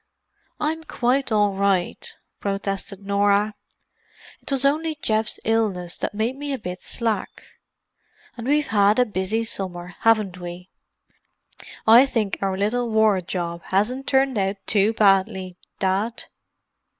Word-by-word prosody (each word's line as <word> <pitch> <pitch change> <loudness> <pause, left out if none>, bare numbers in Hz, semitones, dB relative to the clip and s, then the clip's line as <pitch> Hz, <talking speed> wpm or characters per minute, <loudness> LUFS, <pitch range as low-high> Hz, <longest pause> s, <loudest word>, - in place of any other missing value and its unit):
"I'm 320 +2 -2
quite 260 -2 0
all 205 -2 +3
right," 200 - 0 0.3
protested 195 0 -4
Norah. 200 +1 +2 0.9
"It - - -9
was 275 0 +1
only 310 +3 +1
Geoff's 220 -4 0
illness 205 -6 0
that - - -3
made 225 +5 -1
me 290 +1 -5
a - - -2
bit 180 -5 -7
slack. 225 -4 -1 1.1
And 235 0 -7
we've 295 +1 +2
had 205 -2 +3
a 250 - +4
busy 210 +1 -1
summer, 180 -5 -5
haven't 215 -5 +2
we? 175 +1 -8 1.1
I 235 +5 +8
think 215 -6 -1
our 195 -1 -1
little 230 +4 0
war 220 -3 +3
job 170 -1 -4
hasn't 235 +8 0
turned 265 -4 +2
out 195 +1 -1
too 205 +1 +3
badly, 195 -3 +2 0.2
Dad." 200 +4 -1
210 Hz, 130 wpm, -23 LUFS, 195-240 Hz, 1.1 s, I